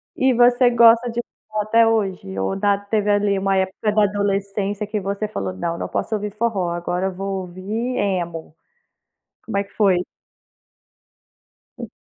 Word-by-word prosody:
E 260 Hz, 0 st, +3 dB
você 245 Hz, +1 st, +5 dB
gosta 235 Hz, 0 st, +5 dB
de 235 Hz, +1 st, -2 dB, 0.3 s
forró 215 Hz, -1 st, -2 dB
até 225 Hz, +2 st, +4 dB
hoje? 190 Hz, -, -1 dB
Ou 95 Hz, 0 st, -1 dB
da 200 Hz, 0 st, +2 dB
teve 205 Hz, +1 st, -1 dB
ali, 205 Hz, -1 st, +2 dB
uma 195 Hz, 0 st, +1 dB
época 190 Hz, +3 st, 0 dB
da 210 Hz, 0 st, +3 dB
adolescência 200 Hz, 0 st, -1 dB
que 210 Hz, +1 st, -3 dB
você 200 Hz, +2 st, -3 dB
falou: 95 Hz, -, -4 dB
"Não 165 Hz, -, -3 dB
não -, -, -4 dB
posso 220 Hz, -, -2 dB
ouvir 210 Hz, -1 st, -3 dB
forró 210 Hz, -4 st, -1 dB
agora, 175 Hz, +2 st, -2 dB
vou 195 Hz, +1 st, -4 dB
ouvir 205 Hz, +8 st, -4 dB
emo". 170 Hz, -5 st, -2 dB, 0.9 s
Como 220 Hz, -, -3 dB
é 200 Hz, -, +1 dB
que 200 Hz, -, -21 dB
foi? 190 Hz, -4 st, +2 dB, 1.7 s
Tá. -, -, -7 dB
200 Hz, 160 wpm, -21 LUFS, 190-220 Hz, 1.7 s, você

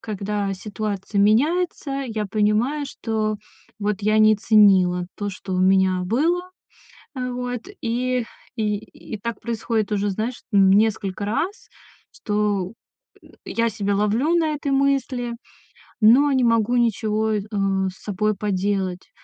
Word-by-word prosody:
когда 205 Hz, -1 st, -3 dB
ситуация 205 Hz, 0 st, -3 dB
меняется, 290 Hz, -, +2 dB, 0.2 s
я 215 Hz, -2 st, -3 dB
понимаю, 215 Hz, +8 st, +1 dB
что, 215 Hz, -4 st, -2 dB, 0.4 s
вот, 205 Hz, -1 st, -2 dB
я 215 Hz, +1 st, +3 dB
не 215 Hz, 0 st, +6 dB
ценила 190 Hz, -5 st, +4 dB
то, 205 Hz, -1 st, -3 dB
что 190 Hz, 0 st, -6 dB
у 185 Hz, -, +1 dB
меня 185 Hz, -1 st, +3 dB
было. 315 Hz, -, +1 dB, 0.7 s
Э, 250 Hz, -1 st, -3 dB
вот, 245 Hz, -1 st, -4 dB, 0.2 s
и 250 Hz, +1 st, 0 dB, 0.4 s
и 210 Hz, -1 st, +1 dB, 0.4 s
и -, -, -5 dB
так 235 Hz, +2 st, -5 dB
происходит 225 Hz, -2 st, -2 dB
уже, 205 Hz, 0 st, 0 dB
знаешь, 220 Hz, +5 st, -4 dB
м, 195 Hz, -1 st, +5 dB
несколько 205 Hz, -1 st, +1 dB
раз, 335 Hz, -, -3 dB, 0.4 s
что, 205 Hz, -3 st, -1 dB, 0.5 s
м, -, -, -18 dB
я 230 Hz, 0 st, 0 dB
себя 205 Hz, -2 st, -1 dB
ловлю 225 Hz, +11 st, +1 dB
на 325 Hz, -2 st, +2 dB
этой 285 Hz, -1 st, -3 dB
мысли, 270 Hz, -3 st, 0 dB, 0.7 s
но 255 Hz, +7 st, +6 dB
не 260 Hz, -2 st, +2 dB
могу 230 Hz, 0 st, +2 dB
ничего, 220 Hz, -2 st, +1 dB
э, 210 Hz, -, 0 dB, 0.5 s
с 185 Hz, -, -18 dB
собой 210 Hz, +1 st, 0 dB
поделать. 195 Hz, -2 st, -2 dB
215 Hz, 135 wpm, -22 LUFS, 200-245 Hz, 0.7 s, не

